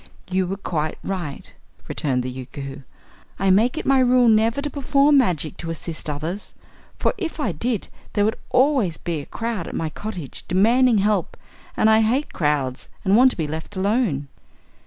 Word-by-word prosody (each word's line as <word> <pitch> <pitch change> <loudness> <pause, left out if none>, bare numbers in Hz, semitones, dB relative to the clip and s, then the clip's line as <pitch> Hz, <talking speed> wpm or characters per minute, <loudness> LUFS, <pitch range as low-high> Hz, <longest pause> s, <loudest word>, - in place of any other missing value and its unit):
"You 185 0 +1
were 195 +2 -3
quite 155 -5 -2
right," 175 -8 -5 0.3
returned 130 -4 -1
the 130 - -4
Yookoohoo. 135 +2 -7 0.6
"I 195 -1 +2
make 230 +10 +3
it - - -3
my 270 -1 +4
rule 250 -1 +5
never 225 +3 +3
to 290 +1 -2
perform 280 +1 +4
magic 170 - 0
to 165 - -6
assist 165 -1 -4
others, 160 +7 -5 0.4
for - - +1
if 335 -4 -4
I 230 -10 0
did 220 +7 -2 0.3
there 205 -1 +2
would 220 +3 -1
always 255 - +2
be 165 -4 -3
crowd 230 -1 -4
at - - -6
my 160 - -1
cottage 180 -9 -7
demanding 230 +6 +4
help 205 -2 +1 0.4
and - - +4
I 220 0 +6
hate 250 +7 0
crowds 145 -5 -1 0.2
and 195 +1 +4
want 255 +3 +7
to - - -6
be 160 - -1
left 160 +6 -6
alone." 190 - 0
195 Hz, 175 wpm, -22 LUFS, 155-245 Hz, 0.6 s, want